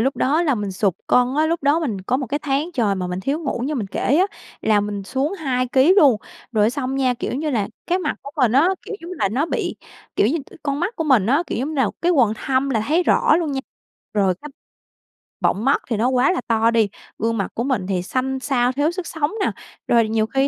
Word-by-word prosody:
lúc 265 Hz, +4 st, +1 dB
đó 305 Hz, +6 st, +2 dB
là 290 Hz, -6 st, +2 dB
mình 205 Hz, -3 st, -3 dB
sụt 190 Hz, -1 st, +1 dB
cân -, -, +5 dB, 0.2 s
á, 310 Hz, -, +4 dB
lúc 330 Hz, -2 st, -1 dB
đó 290 Hz, +4 st, +3 dB
mình 225 Hz, -11 st, -2 dB
có 220 Hz, +7 st, 0 dB
một 270 Hz, -, -3 dB
cái 285 Hz, +5 st, -2 dB
tháng 285 Hz, +4 st, -1 dB
trời 220 Hz, -8 st, +1 dB
mà 185 Hz, -2 st, -3 dB
mình 180 Hz, +1 st, -4 dB
thiếu 275 Hz, +9 st, -1 dB
ngủ 270 Hz, -6 st, -3 dB
như 295 Hz, +3 st, -2 dB
mình 220 Hz, -7 st, -2 dB
kể 260 Hz, +8 st, 0 dB
á, 370 Hz, -, +4 dB, 0.3 s
là 210 Hz, -2 st, +3 dB
mình 205 Hz, -1 st, -3 dB
xuống 265 Hz, -, -2 dB
2 255 Hz, -7 st, -1 dB
ký 270 Hz, +8 st, +5 dB
luôn. 280 Hz, -, +6 dB, 0.4 s
Rồi 215 Hz, -2 st, +3 dB
á, 215 Hz, -, +3 dB
xong 265 Hz, 0 st, -3 dB
nha, 260 Hz, -2 st, +2 dB
kiểu 245 Hz, -, -4 dB
như 300 Hz, +3 st, -2 dB
là, 215 Hz, -7 st, 0 dB, 0.2 s
cái 360 Hz, +2 st, +1 dB
mặt -, -, -2 dB
của 280 Hz, -, -8 dB
mình 250 Hz, -5 st, +3 dB
á, 280 Hz, +8 st, +5 dB
kiểu, -, -, -6 dB
giống 340 Hz, +2 st, -9 dB
như 365 Hz, -, -6 dB
là, -, -, +2 dB
nó 265 Hz, +9 st, 0 dB
bị, -, -, -2 dB, 0.4 s
kiểu -, -, +4 dB
như, 300 Hz, +9 st, +1 dB
t -, -, -18 dB
con 285 Hz, 0 st, -2 dB
mắt 395 Hz, +7 st, -2 dB
của 325 Hz, -, -1 dB
mình 255 Hz, -10 st, +4 dB
á, 280 Hz, +8 st, +3 dB
kiểu, -, -, -3 dB
giống 265 Hz, +5 st, -1 dB
như 315 Hz, -, -5 dB
là, 265 Hz, -6 st, +2 dB
cái 350 Hz, +1 st, +3 dB
quầng 240 Hz, -9 st, +4 dB
thâm 265 Hz, +4 st, 0 dB
là 220 Hz, -5 st, +1 dB
thấy 330 Hz, +4 st, +3 dB
rõ -, -, +4 dB
luôn 325 Hz, -4 st, -1 dB
nha, 270 Hz, -, -1 dB, 0.5 s
rồi 195 Hz, -3 st, +2 dB
c -, -, -30 dB, 1.0 s
bọng 205 Hz, -, +1 dB
mắt 275 Hz, +2 st, +3 dB
thì 235 Hz, -, 0 dB
nó 230 Hz, +4 st, +2 dB
quá 255 Hz, +3 st, +3 dB
là 365 Hz, -, -1 dB
to 225 Hz, 0 st, +3 dB
đi, 225 Hz, -3 st, +2 dB, 0.3 s
gương 225 Hz, +1 st, 0 dB
mặt 195 Hz, -, -2 dB
của 235 Hz, -, -2 dB
mình 255 Hz, -9 st, -1 dB
thì 185 Hz, -2 st, -1 dB
xanh 265 Hz, +6 st, -2 dB
xao, 255 Hz, -2 st, +1 dB
thiếu 290 Hz, +4 st, +1 dB
sức 370 Hz, -1 st, -5 dB
sống 305 Hz, -2 st, -1 dB
nà. -, -, 0 dB, 0.4 s
Rồi 230 Hz, -2 st, +4 dB
nhiều 220 Hz, 0 st, +1 dB
khi 270 Hz, +4 st, -1 dB
260 Hz, 265 wpm, -21 LUFS, 220-295 Hz, 1.0 s, luôn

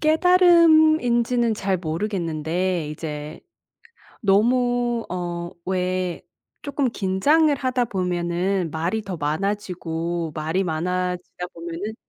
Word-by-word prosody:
깨달음인지는 315 Hz, -8 st, +4 dB
잘 195 Hz, -3 st, -1 dB
모르겠는데 170 Hz, -1 st, -2 dB
이제 150 Hz, 0 st, -6 dB, 0.8 s
너무 240 Hz, +3 st, +2 dB
어 175 Hz, -1 st, -4 dB
왜 185 Hz, -1 st, -1 dB, 0.4 s
쪼끔 280 Hz, -3 st, -1 dB
긴장을 285 Hz, +11 st, +2 dB
하다 255 Hz, -2 st, 0 dB
보면은 180 Hz, -1 st, -1 dB
말이 170 Hz, +8 st, -1 dB
더 195 Hz, -4 st, -6 dB
많아지고 170 Hz, -1 st, -2 dB
말이 160 Hz, +5 st, -1 dB
많아지다 180 Hz, +1 st, -3 dB
보면은 170 Hz, +5 st, -6 dB
185 Hz, 220 characters per minute, -23 LUFS, 170-240 Hz, 0.8 s, 깨달음인지는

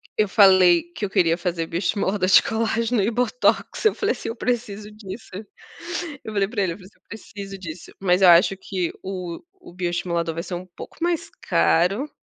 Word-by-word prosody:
eu 215 Hz, -, +2 dB
falei 185 Hz, -4 st, +6 dB
que 210 Hz, -, -8 dB
eu 200 Hz, -, 0 dB
queria 165 Hz, -3 st, +3 dB
fazer 170 Hz, -2 st, -2 dB
bioestimulador 190 Hz, +2 st, -1 dB
de 185 Hz, -, +7 dB
colágeno 230 Hz, 0 st, 0 dB
e 205 Hz, -, +1 dB
botox, 250 Hz, -, 0 dB
eu 435 Hz, -, +3 dB
falei -, -, 0 dB
assim: -, -, -6 dB
"Eu 230 Hz, -, -5 dB
preciso 215 Hz, -4 st, -3 dB
disso". 210 Hz, 0 st, -10 dB, 0.9 s
Eu 220 Hz, -, -7 dB
falei 200 Hz, -1 st, +1 dB
para 215 Hz, -1 st, -2 dB
ele, 175 Hz, -3 st, -1 dB
eu -, -, -11 dB
falei 190 Hz, -2 st, -14 dB
assim: -, -, -32 dB
"Eu -, -, -61 dB
preciso 200 Hz, -3 st, -9 dB
disso", 165 Hz, -2 st, -9 dB
mas 180 Hz, -1 st, +2 dB
eu 185 Hz, -, +8 dB
acho 175 Hz, +3 st, +6 dB
que 185 Hz, -3 st, -3 dB
o 180 Hz, -3 st, -5 dB
o 370 Hz, -, -16 dB
bioestimulador 175 Hz, -2 st, -2 dB
vai 165 Hz, -, -4 dB
ser 180 Hz, -, -7 dB
um 180 Hz, +1 st, -7 dB
pouco 175 Hz, -, -12 dB
mais 345 Hz, +1 st, -1 dB, 0.2 s
caro, 195 Hz, -, +2 dB
195 Hz, 195 wpm, -23 LUFS, 175-220 Hz, 0.9 s, eu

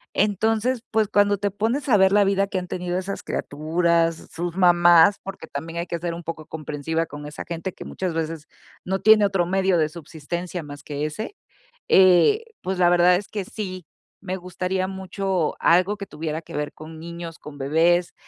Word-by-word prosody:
Entonces, 220 Hz, +4 st, +1 dB
pues, 220 Hz, -1 st, +2 dB
cuando 205 Hz, -1 st, +3 dB
te 200 Hz, +1 st, -1 dB
pones 230 Hz, +8 st, -1 dB
a 215 Hz, -, +6 dB
ver 190 Hz, -1 st, +5 dB
la 205 Hz, 0 st, +5 dB
vida 195 Hz, 0 st, +2 dB
que 195 Hz, -, -3 dB
han 180 Hz, -, -2 dB
tenido 180 Hz, 0 st, -3 dB
esas 190 Hz, +1 st, -4 dB
criaturas, 165 Hz, +2 st, 0 dB
sus 175 Hz, 0 st, -4 dB
mamás, 175 Hz, 0 st, +6 dB
porque 195 Hz, -4 st, -8 dB
también 160 Hz, +3 st, -6 dB
hay 170 Hz, -, -2 dB
que 170 Hz, -1 st, -4 dB
ser 170 Hz, 0 st, -3 dB
un 170 Hz, -, -8 dB
poco 160 Hz, -1 st, -6 dB
comprensiva 160 Hz, +1 st, -3 dB
con 145 Hz, -1 st, -9 dB
esa 150 Hz, -, -7 dB
gente 170 Hz, +2 st, -4 dB
que -, -, -10 dB
muchas 185 Hz, -3 st, -4 dB
veces 165 Hz, -1 st, -3 dB, 0.4 s
no 190 Hz, +1 st, -1 dB
tiene 220 Hz, 0 st, +6 dB
otro 190 Hz, -3 st, 0 dB
medio 190 Hz, 0 st, +2 dB
de 155 Hz, -2 st, +2 dB
subsistencia 170 Hz, +2 st, -6 dB
más 145 Hz, -1 st, -9 dB
que 145 Hz, 0 st, -4 dB
ese. 215 Hz, -, -5 dB, 0.5 s
Eh, 190 Hz, -, +5 dB, 0.2 s
pues, 190 Hz, 0 st, -3 dB
la 175 Hz, -1 st, +5 dB
verdad 175 Hz, +1 st, +5 dB
es 195 Hz, +2 st, -5 dB
que 205 Hz, -2 st, -4 dB
sí, 185 Hz, -5 st, -6 dB, 0.4 s
me 185 Hz, -1 st, -3 dB
gustaría 185 Hz, +1 st, -2 dB
mucho 190 Hz, -2 st, -2 dB
algo 185 Hz, +4 st, +3 dB
que 200 Hz, -, -6 dB
tuviera 155 Hz, -1 st, -4 dB
que 160 Hz, -, -9 dB
ver 150 Hz, 0 st, -3 dB
con 155 Hz, +1 st, -11 dB
niños, 170 Hz, 0 st, -8 dB
con 145 Hz, -1 st, -11 dB
bebés. 165 Hz, +5 st, +2 dB
175 Hz, 190 wpm, -23 LUFS, 165-195 Hz, 0.5 s, a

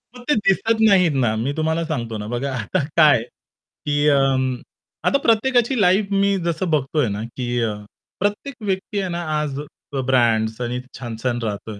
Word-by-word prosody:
मग 245 Hz, -, -11 dB
ते -, -, +4 dB
दिसत 220 Hz, +2 st, +2 dB
नाहीत 180 Hz, -5 st, +4 dB
ना, 120 Hz, -4 st, +1 dB
मी 125 Hz, +6 st, -1 dB
तुम्हाला 160 Hz, +1 st, 0 dB
सांगतो 115 Hz, -8 st, -3 dB
ना. 105 Hz, 0 st, -6 dB
बघा 125 Hz, +4 st, -2 dB
आता 110 Hz, -4 st, -1 dB, 0.2 s
काय 150 Hz, -7 st, +6 dB
की 145 Hz, +4 st, -4 dB
अं 135 Hz, -2 st, +2 dB, 0.5 s
आता 280 Hz, -, +4 dB
प्रत्येकाची 245 Hz, +1 st, +2 dB
लाईफ 195 Hz, +2 st, +3 dB
मी 200 Hz, 0 st, +2 dB
जसं 170 Hz, +1 st, -1 dB
बघतोय 145 Hz, -3 st, +1 dB
ना, 100 Hz, +1 st, -3 dB
की 120 Hz, +1 st, -6 dB
अ, 110 Hz, -2 st, 0 dB, 0.5 s
प्रत्येक 205 Hz, +7 st, -2 dB
व्यक्ती 195 Hz, +1 st, -2 dB
आहे 190 Hz, -2 st, -2 dB
ना, 170 Hz, 0 st, -3 dB, 0.2 s
आज 145 Hz, -2 st, -3 dB
अ, 140 Hz, -2 st, -7 dB
ब्रँड्स 115 Hz, -3 st, +2 dB
आणि 120 Hz, +1 st, -2 dB, 0.2 s
छान-छान 120 Hz, 0 st, -3 dB
राहतोय. 105 Hz, 0 st, -5 dB
145 Hz, 170 wpm, -21 LUFS, 120-190 Hz, 0.5 s, काय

